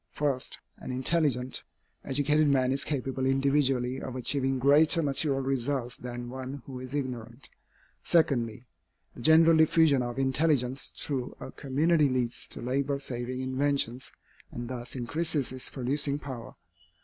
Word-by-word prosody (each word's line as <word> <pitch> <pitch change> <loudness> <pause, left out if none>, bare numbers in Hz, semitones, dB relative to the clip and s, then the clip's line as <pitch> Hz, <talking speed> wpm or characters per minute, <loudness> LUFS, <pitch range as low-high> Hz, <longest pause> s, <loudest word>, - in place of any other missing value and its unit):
First, 140 -4 -1 0.2
an - - -9
intelligent, 130 -1 0 0.4
educated 145 +3 +2
man 130 -2 +3
is 140 +1 +1
capable 135 -2 -2
individually 135 -2 +1
of 130 - -6
achieving 135 +1 0
greater 150 +5 +4
material 140 -1 +2
results 130 -1 -1
than 120 0 -7
one 130 0 -6
who 130 -2 -7
is 130 +2 -7
ignorant. 125 -3 -5 0.5
Secondly, 125 -8 +1 0.5
the - - -11
general 160 +4 +6
diffusion 160 -3 +4
of 120 0 -4
intelligence 135 -1 +1
through 130 -4 -4
a - - -8
community 150 +2 +2
leads 125 -2 -1
to - - -6
labor 140 +3 0
saving 125 -1 -4
inventions, 130 -1 -1 0.4
and 120 0 -6
thus 125 0 -3
increases 145 +3 0
its 130 -1 -2
producing 140 +2 0
power. 130 -5 -8
135 Hz, 135 wpm, -28 LUFS, 125-145 Hz, 0.5 s, general